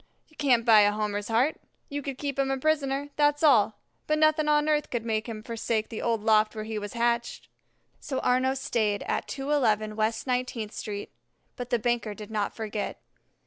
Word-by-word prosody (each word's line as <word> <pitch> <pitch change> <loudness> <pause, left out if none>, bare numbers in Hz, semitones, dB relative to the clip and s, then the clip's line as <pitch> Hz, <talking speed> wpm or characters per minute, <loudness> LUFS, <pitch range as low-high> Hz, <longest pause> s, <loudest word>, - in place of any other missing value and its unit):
You 310 - -23
can't 250 -6 +2
buy 225 -3 +7
a 205 0 +5
Homer's 205 -1 -2
heart. 240 +7 +2 0.3
You 285 0 -4
could 275 -2 -5
keep 280 -1 -4
him 270 0 +2
a 270 - 0
prisoner, 285 -1 0
that's 295 +1 +2
all; 225 -8 +5 0.3
but 305 - +2
nothing 310 0 +3
on 300 0 +3
earth 300 -1 +1
could 235 -2 -3
make 220 0 -1
him 215 -1 -6
forsake 225 -1 -2
the 220 - -5
old 230 -3 0
loft 215 0 +3
where 215 - -4
he 220 0 -4
was 205 0 -6
hatched." 235 0 -1 0.5
So 265 -3 -3
Arnaux 255 +1 +2
stayed 220 -6 -1
at - - -2
211 235 -7 0
West 220 +1 -1
Nineteenth 250 -4 -2
Street. 205 -2 -6 0.4
But 245 -1 -6
the 240 - +2
banker 230 -2 -1
did 210 +1 -10
not 210 -2 -2
forget. 215 -2 -4
235 Hz, 190 wpm, -27 LUFS, 215-275 Hz, 0.5 s, buy